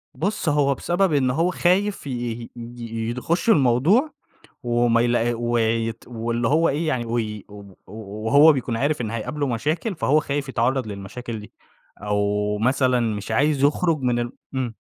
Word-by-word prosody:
بُصّ 190 -1 -1
هو 145 -2 +2
بسبب 175 +4 0
إن 130 -3 +2
هو 165 +7 +1
خايف 185 0 +1
ي - - -4
ي 120 -1 -4 0.7
يخش 170 - -1
الموضوع 170 - +3 0.5
وما 120 -1 +2
يلاق 120 -1 +1
ويت 115 -1 0
واللي 115 0 -2
هو 160 +3 +3
إيه 155 +3 -1
يعني 125 -6 -1
وي 110 -3 -3
و 105 0 -11 0.3
و 105 +1 -8
وهو 145 +6 +7
بيكون 125 -4 -2
عارف 145 +4 0
إن 110 -3 -2
هيقابله 130 +6 -3
مشاكل، 155 - -1
فهو 155 -2 +2
خايف 140 -1 -3
يتعرّض 130 0 0
للمشاكل 110 +3 -7
دي 105 - -13 0.5
أو 105 0 0
مثلًا 130 +2 +2
مش 110 -3 -3
عايز 140 +4 +2
يخرج 160 +2 +2
من 125 -1 +1
ال 120 0 -3 0.2
امم. 125 -3 -2
125 Hz, 155 wpm, -23 LUFS, 115-150 Hz, 0.7 s, وهو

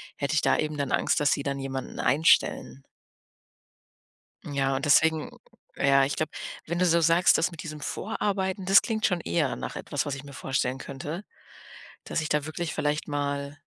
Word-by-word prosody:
hätte 140 +2 -2
ich 155 - +3
da - - +3
eben 155 -1 -2
dann 140 -2 -2
Angst, - - +2
dass 145 -1 +2
sie - - -2
dann 140 -1 -2
jemanden 135 -1 -5
einstellen. 125 - +2 1.6
Ja, 135 -1 0
und 135 +3 -2
deswegen 160 +2 +3 0.4
ja, 135 0 +4
ich 140 +1 -1
glaube, 155 -1 -1 0.3
wenn 170 +2 -3
du 180 - +3
so 170 -1 +4
sagst, 165 +1 +4
dass 170 - +1
mit 170 - -8
diesem 155 -2 -7
Vorarbeiten, 190 +2 -2
das 195 +1 +7
klingt 220 -2 -1
schon 180 -4 +1
eher 155 -6 0
nach - - -6
etwas, 145 - -3
was 145 - -3
ich 140 - -9
mir 140 - -11
vorstellen 130 -1 -1
könnte, 145 +7 -6 0.8
dass - - -2
ich 155 - -3
da 150 -1 +1
wirklich 160 +1 -4
vielleicht 150 0 -1
mal 145 0 -3
150 Hz, 185 wpm, -27 LUFS, 140-165 Hz, 1.6 s, das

